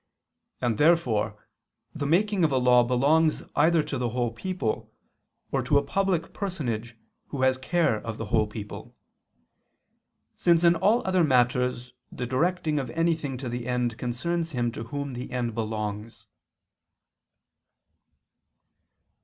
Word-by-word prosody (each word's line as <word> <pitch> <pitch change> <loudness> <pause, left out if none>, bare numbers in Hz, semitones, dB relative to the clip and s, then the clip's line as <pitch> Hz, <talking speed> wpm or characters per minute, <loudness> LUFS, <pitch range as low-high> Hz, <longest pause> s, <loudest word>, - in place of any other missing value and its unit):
And 120 -4 0
therefore 120 - +2 0.5
the 145 -2 -3
making 195 +4 +2
of 155 - +3
a 135 - +2
law 125 -1 +5
belongs 145 +6 +2
either 160 +1 +4
to 135 - -4
the 120 -1 0
whole 120 0 -1
people 180 - -3 0.6
or - - +1
to 145 - +2
a 140 - +2
public 180 +2 -1
personage 120 - -4 0.3
who 135 -2 -3
has 130 0 +3
care 160 -4 +1
of 115 0 -6
the 115 - -4
whole 110 -2 +3
people: 105 -1 -8 1.4
since 170 -1 +3
in 170 0 +6
all 205 +8 +2
other 185 -2 +3
matters 125 -2 +1 0.2
the 125 - -4
directing 155 +4 0
of 130 -3 -4
anything 160 -2 -1
to 130 0 -6
the 120 0 -4
end 125 -2 -1
concerns 165 +7 -2
him 120 -2 0
to 115 - -7
whom 140 +2 -5
the 125 +1 -6
end 120 -2 -2
belongs. 110 -1 -4
130 Hz, 135 wpm, -26 LUFS, 120-165 Hz, 1.4 s, in